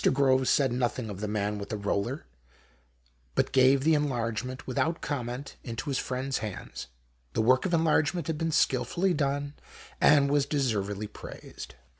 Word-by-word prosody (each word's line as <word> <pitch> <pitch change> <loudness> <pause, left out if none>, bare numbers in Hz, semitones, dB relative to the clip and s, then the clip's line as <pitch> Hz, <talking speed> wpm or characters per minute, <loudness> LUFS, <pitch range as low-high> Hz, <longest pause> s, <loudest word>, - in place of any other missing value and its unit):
Groves 130 -1 +3
said 135 -4 +3
nothing 120 -2 -1
of 95 - -7
the 105 - -3
man 105 0 -1
with 100 - -7
the 110 - -2
roller, 100 +7 -2 1.1
but - - +1
gave 135 +1 +5
the 160 +2 +4
enlargement, 130 -3 -1
without 160 +6 0
com 135 -5 -3
ment, 125 +4 -6
into 120 +4 -4
his 135 - 0
friend's 130 +1 -2
hands. 105 -4 -6 0.5
The - - +1
work 130 +8 +4
of 175 - -3
enlargement 160 0 +2
had 160 -1 -3
been 165 0 0
skilfully 175 +7 +2
done, 145 -1 -1 0.5
and 140 -1 +5
was 145 -1 +2
deservedly 105 -8 -1
praised. 70 -8 -10
130 Hz, 160 wpm, -28 LUFS, 115-145 Hz, 1.1 s, gave